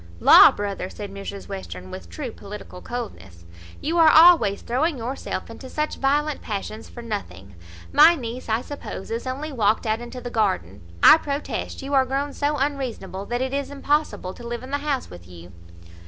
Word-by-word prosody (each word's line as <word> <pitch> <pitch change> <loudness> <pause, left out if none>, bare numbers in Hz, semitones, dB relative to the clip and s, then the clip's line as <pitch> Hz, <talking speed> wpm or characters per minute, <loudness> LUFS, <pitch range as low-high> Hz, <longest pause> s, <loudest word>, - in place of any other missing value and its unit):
"La! - - +9
brother," 200 -2 -4
said 205 -1 -8
Mrs 200 0 -7
Western, 95 - -8
with 85 -2 -9
true 85 - -6
political 200 -2 -10
coldness, 95 - -7 0.4
"you 335 +3 0
are 320 -1 +8
always 315 - +6
throwing 280 +6 0
yourself 245 +3 -4
into 245 +3 -10
such 300 +2 -2
violent 295 +2 0
passions 215 +1 -5
for 240 - -10
nothing. 100 - -6 0.4
My 340 - +8
niece, 245 -3 -6
I 220 +2 +1
suppose, 280 -8 -8
is 230 +3 -3
only 285 +4 -4
walked 220 -3 +1
out 220 +1 0
into 240 +1 -8
the 245 -1 -7
garden. 185 - -1 0.2
I - - +10
protest 285 -1 -4
you 280 +1 -5
are 270 -1 +5
grown 275 +2 -2
so 290 +1 -1
unreasonable, 255 -9 -3
that 240 +1 -2
it 260 0 -3
is 280 0 -2
impossible 285 -9 -1
to 240 - -12
live 235 +1 -5
in 260 - -9
the 285 - 0
house 285 -2 -2
with 85 -1 -12
you." 85 0 -13
240 Hz, 185 wpm, -23 LUFS, 200-280 Hz, 0.4 s, I